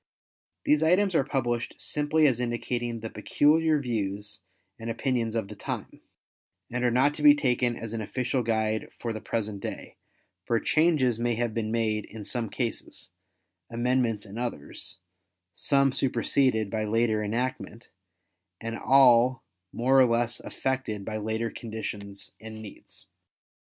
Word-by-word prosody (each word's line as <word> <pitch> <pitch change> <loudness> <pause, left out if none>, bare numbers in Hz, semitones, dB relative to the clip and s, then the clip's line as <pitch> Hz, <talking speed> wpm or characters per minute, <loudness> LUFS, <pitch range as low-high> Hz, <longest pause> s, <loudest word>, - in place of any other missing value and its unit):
These 150 0 +4
items 185 +4 +3
are 160 - +3
published 120 -3 -2
simply 150 +1 +1
as 130 -5 +3
indicating 120 -1 -2
the 115 - -5
peculiar 150 +8 +3
views 105 -5 -3 0.4
and 115 +1 -5
opinions 115 -1 -1
of 110 -3 -1
the 105 - -9
time, - - -6 0.7
and 125 +1 -2
are 125 - +4
not 130 +5 +3
to 150 - -7
be 145 -1 +8
taken 125 -3 +1
as 115 -1 -6
an 115 - -2
official 125 +3 -1
guide 110 -1 -1
for 115 -1 -3
the 110 - -6
present 105 -3 -3
day, - - -7 0.5
for 115 - +1
changes 150 -8 +2
may 120 0 +1
have 120 -1 -1
been 110 -1 -2
made 110 -2 0
in 110 -2 -9
some 115 0 0
cases, 120 -1 -3 0.6
amendments 120 -2 0
in 105 +3 -8
others, 115 -8 -4 0.6
some 140 +4 +2
superseded 125 -4 +1
by 110 -1 -1
later 110 0 +1
enactment 115 +1 -3 0.7
and 115 0 -5
all 130 -2 +5 0.3
more 130 +3 +3
or 130 - +8
less 120 0 +1
affected 130 -7 -3
by 110 -1 -3
later 110 +2 -2
conditions 105 -3 -6
and 110 0 -8
needs. 315 - -10
120 Hz, 145 wpm, -27 LUFS, 110-130 Hz, 0.7 s, be